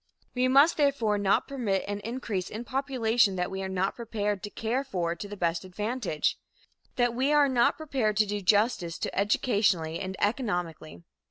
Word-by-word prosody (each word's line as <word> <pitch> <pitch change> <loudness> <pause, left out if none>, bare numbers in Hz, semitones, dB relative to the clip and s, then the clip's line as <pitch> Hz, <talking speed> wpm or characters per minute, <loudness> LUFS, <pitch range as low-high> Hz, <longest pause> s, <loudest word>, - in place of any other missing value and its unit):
We 255 0 +2
must, 280 +5 +5
therefore, 255 -8 +2
not 200 -1 +2
permit 230 -9 -1
an 205 0 -3
increase 215 -4 -4
in 220 +3 -6
population 245 -5 +1
that 180 0 -2
we 190 0 -4
are 190 - -4
not 190 +1 -1
prepared 210 -4 -3
to 205 - -6
care 230 +6 -2
for 175 -10 -2
to 205 - -7
the 205 0 -8
best 170 -1 -1
advantage 205 -2 -2 0.6
that 245 -1 +2
we 265 +4 +1
are 295 -1 +5
not 250 -3 +2
prepared 260 -9 -1
to 215 - +4
do 205 0 -3
justice 200 -3 +2
to, - - -4
educationally 200 -5 +1
and 190 -1 -4
economically. 175 - -2
210 Hz, 175 wpm, -28 LUFS, 190-250 Hz, 0.6 s, must